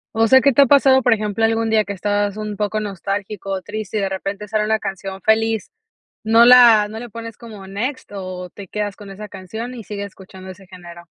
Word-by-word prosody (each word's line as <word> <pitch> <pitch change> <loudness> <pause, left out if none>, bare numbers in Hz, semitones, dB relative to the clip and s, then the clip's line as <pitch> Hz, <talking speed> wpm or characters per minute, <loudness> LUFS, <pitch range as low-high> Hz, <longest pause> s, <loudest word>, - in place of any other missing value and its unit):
O 225 0 +3
sea, 260 +2 +6
que 280 - +4
te 280 - +5
ha 275 - +5
pasado, 265 -1 +5
por 245 - +2
ejemplo, 210 0 -2
algún 225 0 +1
día 215 -1 +3
que 200 - -5
estabas 205 +1 -1
un 210 -1 -5
poco 210 +1 -2
nostálgico 200 0 -5
o 190 -1 -3
triste 215 0 -5
y - - +1
de 195 - -1
repente 195 +2 -5
sale 215 0 0
una 220 +1 +1
canción 195 -2 -6
feliz, 220 0 +1 0.5
no 225 +2 +5
la 235 -4 +7
¿no 220 +1 -8
le 240 +1 -8
pones 230 0 -8
como 215 -4 -11
next 230 +8 -5
o 185 -2 -6
te 200 +2 -11
quedas 205 +1 -4
con 205 -2 -12
esa 210 +2 -9
canción, 220 +6 -7
y 230 -3 -9
sigues 200 0 -6
escuchando 190 -1 -13
ese 190 +1 -13
género? 175 -2 -12
210 Hz, 225 wpm, -19 LUFS, 195-225 Hz, 0.5 s, la